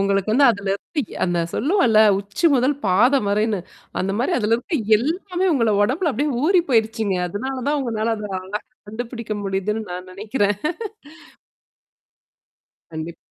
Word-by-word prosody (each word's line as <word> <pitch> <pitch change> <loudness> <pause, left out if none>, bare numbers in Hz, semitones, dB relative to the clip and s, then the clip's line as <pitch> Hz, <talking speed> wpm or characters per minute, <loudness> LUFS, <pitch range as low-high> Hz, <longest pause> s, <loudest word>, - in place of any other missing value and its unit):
உங்களுக்கு 195 +1 +1
வந்து 275 +4 +5
அதல 200 -3 -4
இருந்து 295 - -4 0.2
அந்த 175 -1 0
சொல்லுவோல, 265 - +3 0.2
உச்சி 205 - -1
முதல் 260 +2 +2
பாத 245 +9 +4
வரைன்னு 210 -1 +1 0.4
அந்த 195 +1 -1
மாரி 270 +9 +1
அதுல 220 -1 +2
இருக்க 285 +7 -3 0.2
எல்லாமே 360 - -1
உங்கள 230 -6 +2
உடம்புல 305 - +1
அப்படியியே 280 +2 -1
ஊறி 360 +1 +4
போயடுச்சுங்க. 220 -3 +1
அதனால 260 +8 -4
தான் 295 0 +1
உங்களால 225 -3 -1
அத 210 -1 -6
அழகா 195 +3 -5 0.3
கண்டுபிடிக்க 230 0 -5
முடியுதுன்னு 195 +3 -1
நான் 180 +1 -7
நினைக்கிறேன். 205 +1 0 2.4
கண்டிப் 160 +1 -6
220 Hz, 135 wpm, -21 LUFS, 200-270 Hz, 2.4 s, வந்து